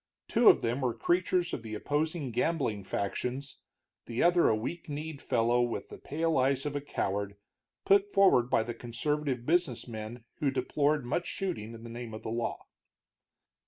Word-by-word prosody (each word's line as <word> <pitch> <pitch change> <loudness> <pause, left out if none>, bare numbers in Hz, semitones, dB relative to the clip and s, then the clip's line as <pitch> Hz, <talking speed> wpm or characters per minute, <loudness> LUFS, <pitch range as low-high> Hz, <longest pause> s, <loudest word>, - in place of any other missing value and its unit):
Two - - +6
of - - +5
them 120 +4 0
were 125 -3 0
creatures 175 +6 +1
of - - -2
the 110 -1 -6
opposing 150 +3 -1
gambling 120 -5 0
factions, 125 +8 -3 0.5
the 115 +1 0
other 175 0 +5
a 110 - +3
weak 160 +10 -5
kneed 150 0 -5
fellow 120 +1 +2
with 120 -1 -2
the - - -10
pale 160 0 0
eyes 135 +1 +2
of 145 -1 -2
a 145 - -1
coward, 100 -7 -2 0.5
put 200 +1 +4
forward 185 -12 +5
by 110 - +3
the 120 +1 -4
conservative 125 +2 -2
business 160 -7 +1
men 110 +1 -7 0.2
who 145 - +2
deplored 140 +2 +1
much 170 +8 -1
shooting 140 - -4
in 115 - -11
the - - -8
name 120 -2 -6
of 110 - -9
the - - -4
law. 115 0 -3
130 Hz, 175 wpm, -30 LUFS, 115-155 Hz, 0.5 s, Two